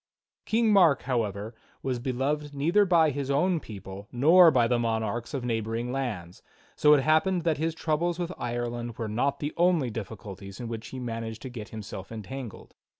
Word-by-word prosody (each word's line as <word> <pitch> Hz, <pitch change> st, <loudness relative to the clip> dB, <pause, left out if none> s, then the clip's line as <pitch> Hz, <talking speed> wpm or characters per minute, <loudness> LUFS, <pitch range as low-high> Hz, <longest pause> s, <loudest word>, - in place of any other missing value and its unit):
King 225 Hz, -1 st, +2 dB
Mark, 175 Hz, -8 st, +5 dB
however, 110 Hz, -4 st, -2 dB, 0.3 s
was 130 Hz, -2 st, -1 dB
beloved 140 Hz, +4 st, -2 dB
neither 170 Hz, +9 st, +3 dB
by 165 Hz, -4 st, +4 dB
his 140 Hz, 0 st, -4 dB
own 165 Hz, +5 st, +2 dB
people 100 Hz, -4 st, -9 dB
nor 165 Hz, +8 st, +7 dB
by 125 Hz, -6 st, +3 dB
the 120 Hz, 0 st, +1 dB
monarchs 115 Hz, 0 st, -1 dB
of 130 Hz, -3 st, -3 dB
neighboring 115 Hz, +1 st, -2 dB
lands, 105 Hz, -10 st, -4 dB, 0.3 s
so 150 Hz, 0 st, +6 dB
it 140 Hz, -, +3 dB
happened 165 Hz, +4 st, +2 dB
that 160 Hz, -3 st, +1 dB
his 160 Hz, 0 st, -1 dB
troubles 165 Hz, +2 st, 0 dB
with 175 Hz, 0 st, -3 dB
Ireland 120 Hz, -1 st, -3 dB
were 115 Hz, -, -3 dB
not 125 Hz, +6 st, 0 dB
the 145 Hz, +1 st, -3 dB
only 170 Hz, -8 st, +3 dB
difficulties 100 Hz, -2 st, -8 dB
in 120 Hz, -, -5 dB
which 115 Hz, -1 st, -6 dB
he 130 Hz, -, -8 dB
managed 115 Hz, -2 st, -5 dB
to 130 Hz, -, -5 dB
get 110 Hz, -5 st, -8 dB
himself 100 Hz, -2 st, -8 dB
entangled. 115 Hz, +2 st, -8 dB
125 Hz, 175 wpm, -27 LUFS, 115-155 Hz, 0.3 s, nor